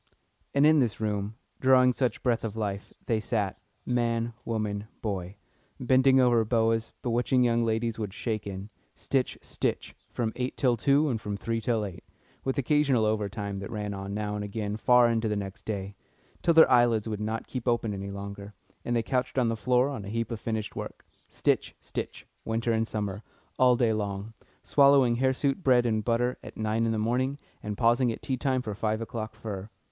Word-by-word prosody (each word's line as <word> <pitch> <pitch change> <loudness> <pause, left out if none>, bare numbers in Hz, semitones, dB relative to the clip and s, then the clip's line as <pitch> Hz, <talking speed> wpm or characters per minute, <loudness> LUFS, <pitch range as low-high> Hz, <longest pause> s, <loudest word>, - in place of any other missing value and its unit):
And 140 +1 +5
in 155 0 +6
this 120 -5 0
room, 105 0 -2 0.2
drawing 130 -1 +5
such 125 -3 -1
breath 120 -3 +1
of 110 -2 -4
life, 100 -2 -3
they 115 -2 +1
sat 105 -3 -2 0.2
man, 120 -1 0
woman, 105 -2 -2
boy 95 -3 -4 0.4
bending 130 +1 +4
over 120 -3 +4
boas 115 0 +1
bewitching 125 +1 +2
young 120 -1 +2
ladies 115 0 -1
would 105 -3 -3
skate 110 +1 -3
in; 100 +2 -6 0.2
stitch, 135 -2 -1
stitch, - - -3 0.2
from 115 -2 -2
eight 125 +1 -3
till 125 -3 +3
two 140 +6 +3
and 115 -6 -1
from 105 -1 -4
three 115 +2 -2
to 115 -2 0
eight, 90 -2 -8 0.4
with 135 - -1
occasional 140 -4 +3
overtime 100 -2 -2
that 100 - -6
ran 105 -2 -4
on 100 0 -5
now 105 -1 -2
and 105 0 -3
again 105 0 -3
far 125 +2 +5
into 115 -1 +1
the 105 - 0
next 95 -2 -6
day; 100 -2 -3 0.5
till 170 - +3
their 160 -4 +8
eyelids 120 -3 +4
would 105 -1 -3
not 110 +1 -2
keep 125 -2 -6
open 115 -3 +1
any 100 0 -5
longer, 100 +1 -7 0.3
and 120 - -1
they 115 - +1
couched 130 +1 -1
on 125 -3 +3
the 115 - 0
floor 125 +3 +2
on 135 -7 -5
a 100 - -7
heap 115 +2 -2
of 115 - -3
finished 110 -2 -3
work; - - -7 0.2
stitch, - - 0
stitch, - - -6 0.2
winter 115 +1 -1
and 110 0 +1
summer, 105 -2 -3 0.4
all 125 -1 +6
day 115 -2 +2
long, 100 0 -3 0.3
swallowing 140 -4 +5
hirsute 135 +5 +1
bread 125 -2 +4
and 110 -2 +1
butter 120 +2 0
at - - -11
nine 110 +1 0
in - - +1
the 110 - -1
morning, 125 +5 0 0.2
and 105 -1 -5
pausing 120 +1 +3
at - - -7
tea 130 - -1
time 130 -1 0
for 105 - -4
five 110 +2 -1
o'clock 110 -1 -5
fur. 105 -3 -6
115 Hz, 195 wpm, -28 LUFS, 105-125 Hz, 0.5 s, their